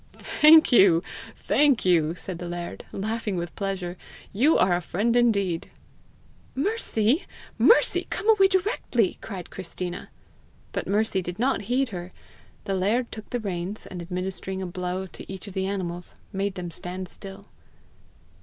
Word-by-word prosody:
"Thank 315 Hz, 0 st, +6 dB
you, 190 Hz, -7 st, +6 dB, 0.3 s
thank 285 Hz, -7 st, +2 dB
you!" 165 Hz, -3 st, +3 dB
said 180 Hz, -1 st, -7 dB
the 175 Hz, -, -5 dB
laird, 175 Hz, 0 st, -6 dB
laughing 215 Hz, 0 st, -2 dB
with 170 Hz, -1 st, -4 dB
pleasure. 190 Hz, -3 st, -3 dB, 0.4 s
"You 270 Hz, +11 st, +4 dB
are 180 Hz, -1 st, +4 dB
a 175 Hz, -, -1 dB
friend 210 Hz, +7 st, 0 dB
indeed!" 200 Hz, -8 st, +2 dB, 0.9 s
"Mercy! 280 Hz, -, +1 dB, 0.3 s
Mercy! 475 Hz, -, +5 dB
come 420 Hz, -, -3 dB
away 420 Hz, -3 st, +6 dB
directly," 375 Hz, -, 0 dB
cried 190 Hz, -5 st, -7 dB
Christina. 180 Hz, -1 st, -6 dB, 0.6 s
But -, -, -3 dB
Mercy 205 Hz, -1 st, +1 dB
did 180 Hz, 0 st, -6 dB
not 250 Hz, -3 st, 0 dB
heed 260 Hz, +1 st, +2 dB
her. 180 Hz, -2 st, -7 dB, 0.5 s
The 195 Hz, -, -2 dB
laird 215 Hz, +6 st, +1 dB
took 215 Hz, -1 st, -8 dB
the 245 Hz, -, -2 dB
reins, 195 Hz, -1 st, -4 dB
and 180 Hz, -2 st, -7 dB
administering 185 Hz, +2 st, -4 dB
a 190 Hz, -, -3 dB
blow 180 Hz, +1 st, -3 dB
each 190 Hz, -1 st, -8 dB
to 200 Hz, -, -8 dB
the 190 Hz, 0 st, -2 dB
animals, 175 Hz, -3 st, -4 dB, 0.2 s
made 195 Hz, 0 st, -1 dB
them 175 Hz, -2 st, -5 dB
stand 180 Hz, +3 st, -5 dB
still. 195 Hz, +2 st, -10 dB
195 Hz, 145 wpm, -25 LUFS, 180-230 Hz, 0.9 s, Thank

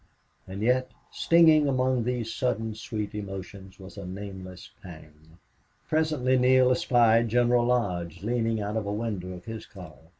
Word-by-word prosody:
And 95 Hz, +2 st, -6 dB
yet, 130 Hz, +2 st, +2 dB, 0.2 s
stinging 160 Hz, -3 st, +4 dB
among 130 Hz, -2 st, +1 dB
these 120 Hz, -2 st, -2 dB
sudden 115 Hz, -3 st, -2 dB
sweet 105 Hz, -1 st, -5 dB
emotions 95 Hz, -1 st, -8 dB
was 95 Hz, +1 st, -11 dB
a -, -, -7 dB
nameless 95 Hz, -1 st, -9 dB
pang. 80 Hz, -2 st, -14 dB, 0.5 s
Presently 155 Hz, -5 st, +1 dB
Neale 130 Hz, 0 st, +4 dB
espied 120 Hz, -2 st, +3 dB
General 120 Hz, +1 st, +3 dB
Lodge 90 Hz, -8 st, -1 dB
leaning 115 Hz, 0 st, 0 dB
out 105 Hz, +1 st, -3 dB
of 105 Hz, -2 st, -3 dB
a -, -, -2 dB
window 105 Hz, -4 st, -4 dB
of 90 Hz, -1 st, -11 dB
his 110 Hz, -1 st, -7 dB
car. 90 Hz, -8 st, -12 dB
110 Hz, 145 wpm, -27 LUFS, 95-125 Hz, 0.5 s, stinging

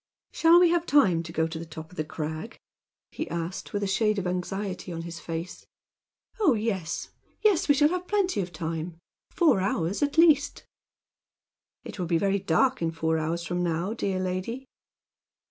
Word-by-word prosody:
"Shall 330 Hz, +1 st, +6 dB
we 350 Hz, -1 st, +5 dB
have 345 Hz, 0 st, +1 dB
time 190 Hz, -, +4 dB
to 165 Hz, 0 st, -8 dB
go 160 Hz, 0 st, +1 dB
to 160 Hz, 0 st, -5 dB
the -, -, -5 dB
top 160 Hz, +1 st, -9 dB
of -, -, -14 dB
the 155 Hz, -, -1 dB
crag?" 155 Hz, +6 st, -6 dB, 0.5 s
he -, -, -5 dB
asked, 170 Hz, +2 st, -4 dB
with 205 Hz, 0 st, -2 dB
a -, -, 0 dB
shade 215 Hz, +2 st, +1 dB
of 195 Hz, -, -2 dB
anxiety 185 Hz, +1 st, -3 dB
on 165 Hz, -1 st, -5 dB
his 170 Hz, 0 st, -7 dB
face. 165 Hz, +2 st, -6 dB, 0.7 s
"Oh, 335 Hz, -, +4 dB
yes! 200 Hz, -7 st, -2 dB, 0.3 s
yes! 405 Hz, -8 st, +3 dB
We 285 Hz, -, +6 dB
shall 295 Hz, +2 st, +4 dB
have 360 Hz, +1 st, -3 dB
plenty 385 Hz, -, +1 dB
of 180 Hz, -1 st, -5 dB
time 165 Hz, +1 st, -4 dB, 0.3 s
four 325 Hz, -, +3 dB
hours, 185 Hz, -1 st, -1 dB
at 290 Hz, +1 st, 0 dB
least." 310 Hz, -4 st, +4 dB, 1.2 s
"It -, -, -9 dB
will 180 Hz, -, -2 dB
be 170 Hz, 0 st, +2 dB
very 200 Hz, +3 st, +1 dB
dark 195 Hz, +8 st, +2 dB
in 165 Hz, -, +1 dB
four 160 Hz, 0 st, 0 dB
hours 165 Hz, +2 st, -2 dB
from 175 Hz, 0 st, -2 dB
now, 175 Hz, +4 st, -1 dB
dear 195 Hz, -4 st, -2 dB
lady." 185 Hz, +8 st, -3 dB
185 Hz, 180 wpm, -27 LUFS, 165-260 Hz, 1.2 s, Shall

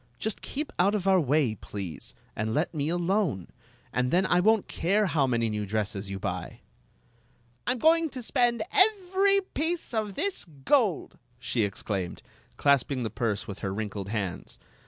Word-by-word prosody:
Just 220 Hz, -1 st, -3 dB
keep 295 Hz, +2 st, -4 dB
out 200 Hz, +4 st, +4 dB
of 195 Hz, -2 st, -2 dB
our 190 Hz, -1 st, +5 dB
way, 145 Hz, -5 st, +2 dB
please, 100 Hz, -5 st, -7 dB, 0.2 s
and 110 Hz, +2 st, -2 dB
let 155 Hz, +4 st, 0 dB
me 150 Hz, -1 st, -1 dB
alone, 175 Hz, -, 0 dB, 0.4 s
and 125 Hz, 0 st, +1 dB
then 180 Hz, +5 st, +3 dB
I 175 Hz, -, +3 dB
won't 220 Hz, +2 st, +3 dB
care 200 Hz, +5 st, +1 dB
how 150 Hz, -7 st, +2 dB
many 115 Hz, -2 st, +1 dB
new 105 Hz, -1 st, -2 dB
dresses 100 Hz, -1 st, -2 dB
you 100 Hz, -, -4 dB
buy." -, -, -5 dB, 1.1 s
"I 245 Hz, -, +3 dB
'm -, -, -5 dB
goin% 320 Hz, +4 st, +4 dB
to 255 Hz, -2 st, -5 dB
spend 240 Hz, -1 st, +2 dB
every 395 Hz, -1 st, +4 dB
piece 325 Hz, -2 st, -2 dB
of 215 Hz, -3 st, -2 dB
this 400 Hz, -1 st, -1 dB, 0.2 s
gold!" 230 Hz, -, +2 dB, 0.2 s
she 120 Hz, -1 st, -1 dB
exclaimed, 100 Hz, -2 st, -3 dB, 0.3 s
clasping 140 Hz, -2 st, +2 dB
the 110 Hz, -, -3 dB
purse 110 Hz, -2 st, -2 dB
with 100 Hz, -2 st, -7 dB
her 95 Hz, -, -3 dB
wrinkled 100 Hz, -1 st, -4 dB
hands. 100 Hz, -5 st, -4 dB
155 Hz, 165 wpm, -28 LUFS, -, 1.1 s, our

